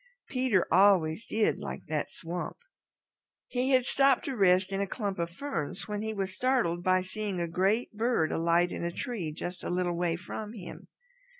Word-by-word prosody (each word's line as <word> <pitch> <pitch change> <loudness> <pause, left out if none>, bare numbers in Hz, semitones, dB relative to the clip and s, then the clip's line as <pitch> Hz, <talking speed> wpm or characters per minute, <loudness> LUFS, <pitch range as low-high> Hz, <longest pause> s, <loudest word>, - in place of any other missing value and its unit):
Peter 255 -8 +2
always 185 0 +4
did 220 -1 +1
like - - -6
that 155 -2 -2
swamp. 175 +2 -5 0.9
He 250 +1 -1
had 255 -2 +4
stopped 275 -1 +3
to 270 - -3
rest 190 -2 +4
in 195 0 -1
a 200 - 0
clump 200 -3 -3
of 170 0 -1
ferns 170 - -4
when 210 -1 -3
he 220 0 -2
was 195 -3 -3
startled 230 -7 +1
by 185 +1 +3
seeing 200 -1 -3
a 170 - -1
great 195 +9 +1
bird 225 -7 +1
alight 170 +2 +2
in - - -4
a 170 - -1
tree 180 -5 -4
just 175 +4 -6
a - - -3
little 175 -1 0
way 170 -1 0
from 210 +5 -6
him. 190 -6 -9
190 Hz, 185 wpm, -29 LUFS, 175-220 Hz, 0.9 s, always